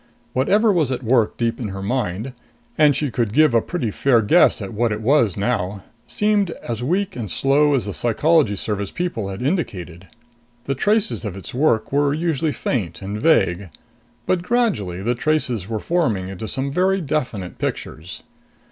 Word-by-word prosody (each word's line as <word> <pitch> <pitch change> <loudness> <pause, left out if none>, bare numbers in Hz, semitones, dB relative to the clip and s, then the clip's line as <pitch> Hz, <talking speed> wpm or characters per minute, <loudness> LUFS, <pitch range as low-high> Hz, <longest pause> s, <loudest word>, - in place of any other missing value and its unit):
Whatever 205 - +3
was 155 -7 +1
at 130 0 -3
work 115 -2 +2
deep 115 -1 -1
in 120 - -3
her 95 -1 -6
mind 120 +1 -2 0.4
and 150 -2 +4
she 145 -4 -1
could 115 -4 -1
give 155 -1 +4
a 115 - +4
pretty 125 - -3
fair 125 +2 +3
guess 105 - +4
at 100 -1 -6
what 115 +2 0
it 105 - -2
was 115 - +2
now 100 -1 -1 0.2
seemed 210 -2 +1
as 120 -1 -4
weak 185 +9 -1
and 110 -5 -5
slow 140 - +3
as 120 -7 0
the 100 - -4
Psychology 135 - +2
Service 100 0 -3
people 170 - -3
had 95 +5 -6
indicated. 95 - -3 0.6
The 135 - -1
traces 195 - +1
of 100 -4 -5
its 95 - -9
work 125 -4 +1
were 145 +1 +2
usually 160 -1 0
faint 100 - -3
and 105 +2 -4
vague. 100 - +2 0.6
But 185 - +1
gradually 180 - 0
the 120 +3 +1
traces 125 - -1
were 110 -1 -2
forming 115 - 0
into 95 +3 -6
some 135 +4 -2
very 190 +5 +2
definite 130 - -3
pictures. 80 +3 -5
120 Hz, 175 wpm, -21 LUFS, 100-155 Hz, 0.6 s, and